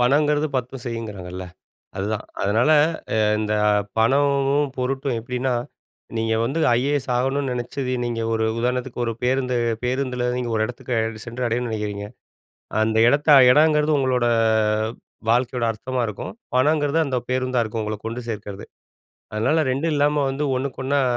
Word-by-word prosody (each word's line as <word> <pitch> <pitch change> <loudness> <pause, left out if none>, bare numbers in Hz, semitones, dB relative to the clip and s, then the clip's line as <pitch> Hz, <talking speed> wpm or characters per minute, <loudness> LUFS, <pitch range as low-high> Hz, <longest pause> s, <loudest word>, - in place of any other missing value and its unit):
பணங்கிறது 145 +4 +3
பத்தும் 125 0 -4
செய்யுங்கிறாங்கல்ல, 100 -6 -5 0.5
அதுதான். 105 +2 -2 0.2
அதனால 110 +8 +2 0.4
அ - - +1 0.2
இந்த 105 0 -1 0.4
பணமும் 140 +3 +2
பொருட்டும் 135 0 -1
எப்படின்னா, 125 +2 -2 0.6
நீங்க 115 0 0
வந்து 140 +8 -1 0.2
ஐஏஎஸ் 140 +1 -1
ஆகணும்னு 135 +2 0
நினைச்சது 125 +2 -3
நீங்க 120 -1 -2
ஒரு 110 0 +1
உதாரணத்துக்கு 125 +1 -2
ஒரு 115 - -1
பேருந்து 125 0 +1 0.3
பேருந்தில 125 -1 -1
நீங்க 125 -1 -2
ஒரு 110 - +2
இடத்துக்கு 115 -2 -3
சென்று 120 +2 -4
அடையணும்னு 120 +1 -1
நினைக்கிறீங்க, 105 -2 -3 0.8
அந்த 110 0 +1
எடத்த 145 +3 +1 0.2
எடங்கிறது 150 0 +4
உங்களோட 130 -2 +1 1.1
வாழ்க்கையோட 125 0 +1
அர்த்தமா 125 +3 -3
இருக்கும், 105 - -6 0.2
பணங்கிறது 145 +3 +2
அந்த 130 -2 -1
பேருந்தா 130 -1 +1
இருக்கும், 110 0 -4
உங்கள 105 0 -3
கொண்டு 115 +2 -4
சேர்க்கிறது, 105 -2 -6 0.7
அதனால 125 +9 +1
ரெண்டும் 155 +4 0
இல்லாம 145 0 +2
வந்து 145 +2 -2
ஒன்னுக்கொன்னா 140 +1 -1
125 Hz, 130 wpm, -22 LUFS, 115-140 Hz, 1.1 s, எடங்கிறது